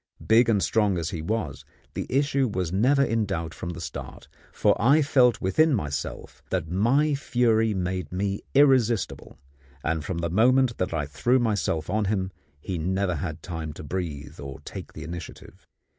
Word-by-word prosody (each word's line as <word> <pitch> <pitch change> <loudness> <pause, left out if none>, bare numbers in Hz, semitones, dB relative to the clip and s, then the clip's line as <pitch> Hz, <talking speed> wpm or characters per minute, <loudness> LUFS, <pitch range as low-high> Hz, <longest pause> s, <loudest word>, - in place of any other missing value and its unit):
Big 115 +1 +5
and 105 -4 +3
strong 105 -4 +2
as 80 -2 -2
he 80 - -4
was, 85 - -3 0.3
the - - -4
issue 140 0 +2
was 95 -6 -2
never 130 +8 +4
in 115 -3 +1
doubt 85 -5 -3
from 85 - -6
the 85 0 -6
start; 80 - -7 0.2
for - - +2
I 140 +7 +5
felt 125 -4 +4
within 140 - +3
myself 75 -8 -4
that - - -1
my 135 +11 +3
fury 115 -5 +2
made 90 -3 -3
me 100 +2 -2
irresistible, 130 -6 +2 0.5
and 80 -1 -1
from 85 +4 -4
the 85 -1 -2
moment 125 +4 +3
that 90 - -1
I 80 -3 -1
threw 75 - +1
myself 105 -9 0
on 105 0 0
him 95 -2 -1 0.3
he 90 +3 -4
never 95 +3 0
had 80 +1 -5
time 80 -2 -5
to 75 - -9
breathe 75 -3 -5
or 70 -1 -7
to 70 - -21
take - - -8
the 80 - -8
initiative. 85 +1 -9
95 Hz, 175 wpm, -26 LUFS, 80-120 Hz, 0.5 s, Big